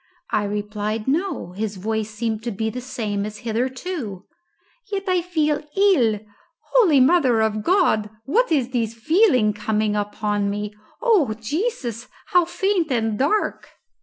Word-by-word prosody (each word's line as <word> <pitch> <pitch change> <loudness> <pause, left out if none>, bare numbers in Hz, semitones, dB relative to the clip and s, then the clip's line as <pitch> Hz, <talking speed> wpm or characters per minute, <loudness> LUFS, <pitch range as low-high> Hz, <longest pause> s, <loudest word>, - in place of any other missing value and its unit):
I 205 - +1
replied, 210 +2 -3
No; 315 - -1
his 205 +1 -4
voice 220 +2 -2
seemed 220 0 -3
to 240 - -1
be 220 +2 -2
the 250 - -5
same 215 -5 -3
as 210 0 -5
hitherto. 250 - -3 0.7
"Yet 395 -1 -1
I 365 -1 +2
feel 310 -4 0 0.2
ill. 270 - +4 0.5
Holy 370 - +5
Mother 260 -4 +4
of 215 -1 0
God, 340 - +2 0.2
what 450 - +2
is 265 -6 +2
this 230 -3 -1
feeling 255 - +3
coming 210 0 0
upon 205 0 -1
me? 205 +1 -3 0.3
O 375 - +3
Jesus, 245 - -3 0.3
how 355 -1 +6
faint 350 -2 0
and 225 -3 0
dark!" 355 +11 0
235 Hz, 140 wpm, -22 LUFS, 210-330 Hz, 0.7 s, how